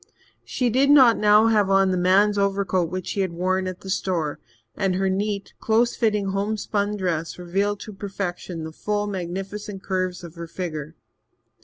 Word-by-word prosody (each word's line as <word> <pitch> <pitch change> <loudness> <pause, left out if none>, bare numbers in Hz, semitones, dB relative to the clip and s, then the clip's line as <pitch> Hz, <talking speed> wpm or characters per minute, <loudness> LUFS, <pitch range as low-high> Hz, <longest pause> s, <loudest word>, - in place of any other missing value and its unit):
She 250 -3 -1
did 270 +4 +3
not 260 -6 +7
now 210 +1 +5
have 210 -3 +3
on 195 -1 +4
the - - +1
man's 190 +3 +4
overcoat 195 -3 +1
which 185 0 -4
she - - -3
had 190 -3 0
worn 185 +2 0
at 185 -1 -6
the 190 - -9
store, 165 -6 -1 0.4
and 190 -1 0
her 190 0 +1
neat, 200 +1 -2
close 230 +2 +2
fitting 210 -4 +1
home 200 +3 -1
spun 205 0 -1
dress 170 -4 -2
revealed 195 +4 -1
to 215 - -8
perfection 185 -4 -5
the 160 - -6
full, 205 +5 -2
magnificent 195 +1 -5
curves 185 -2 -2
of 170 -2 -9
her 170 -1 -7
figure. 160 -3 -5
195 Hz, 175 wpm, -23 LUFS, 180-205 Hz, 0.4 s, not